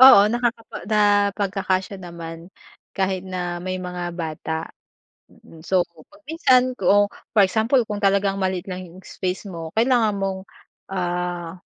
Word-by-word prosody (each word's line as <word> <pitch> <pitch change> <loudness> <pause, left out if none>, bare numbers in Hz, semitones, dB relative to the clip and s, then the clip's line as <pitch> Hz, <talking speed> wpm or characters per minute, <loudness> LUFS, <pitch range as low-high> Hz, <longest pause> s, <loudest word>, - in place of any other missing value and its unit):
Oo 260 -6 +11
nakapag 235 -5 -2
napagkaksya 200 -2 +2
naman 170 -1 -8 0.4
kahit 190 -1 0
na 175 -1 -3
may 185 0 -3
mga 180 -1 -4
bata. 160 -1 -4 1.0
So 185 0 +3 0.3
pag 300 +1 -19
minsan 255 -6 +3
kung 205 0 +4 0.3
for 210 - +6
example 225 +6 +2
kung 210 - -2
talagang 195 0 +3
maliit 185 -1 -1
lang 185 0 -5
yung 180 +2 -13
space 185 +2 -4
mo, 165 -2 -6
kailangan 230 -3 +4
mong 195 -1 -1 0.5
ah, 175 -1 -2
190 Hz, 130 wpm, -23 LUFS, 175-210 Hz, 1.0 s, Oo